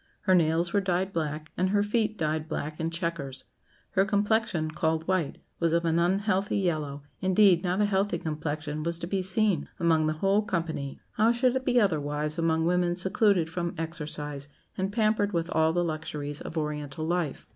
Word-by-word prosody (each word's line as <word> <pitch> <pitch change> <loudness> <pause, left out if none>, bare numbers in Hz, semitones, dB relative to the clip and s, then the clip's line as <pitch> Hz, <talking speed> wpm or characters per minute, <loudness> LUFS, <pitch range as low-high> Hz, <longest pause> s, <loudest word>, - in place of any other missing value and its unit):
Her 190 - +3
nails 170 0 +2
were 200 - +3
dyed 190 +1 -1
black, 155 -1 -3
and 185 +1 +1
her 205 +1 +3
feet 215 0 0
dyed 155 -1 -1
black 155 0 -4
in 160 0 -1
chequers. 165 -6 -3 0.5
Her 190 - +3
complexion, 205 -5 +1
called 160 0 -1
white, 185 -6 0 0.2
was 165 -1 +1
of 170 0 +2
an 165 0 +2
unhealthy 195 +3 +1
yellow; 155 -7 -1 0.2
indeed, 185 -2 +5
not 185 +2 +1
a - - +4
healthy 195 -2 +1
complexion 155 -1 -3
was 170 +1 -1
to 170 - -5
be 190 +2 -1
seen 190 +1 +1
among 160 -2 +3
the 155 - +1
whole 195 +6 +2
company. 165 -8 -3 0.2
How 220 +2 +5
should 245 +1 +2
it 260 0 -1
be 245 -1 +4
otherwise 150 -5 0
among 160 -1 +2
women 175 0 +2
secluded 190 -1 +2
from 170 +1 -3
exercise, 150 -3 -4 0.3
and 190 +1 -2
pampered 215 -2 +1
with 170 0 -1
all 160 0 +3
the 175 +1 +1
luxuries 150 -2 -4
of 165 - -6
Oriental 150 0 -3
life. 170 -4 -2
170 Hz, 180 wpm, -28 LUFS, 155-195 Hz, 0.5 s, indeed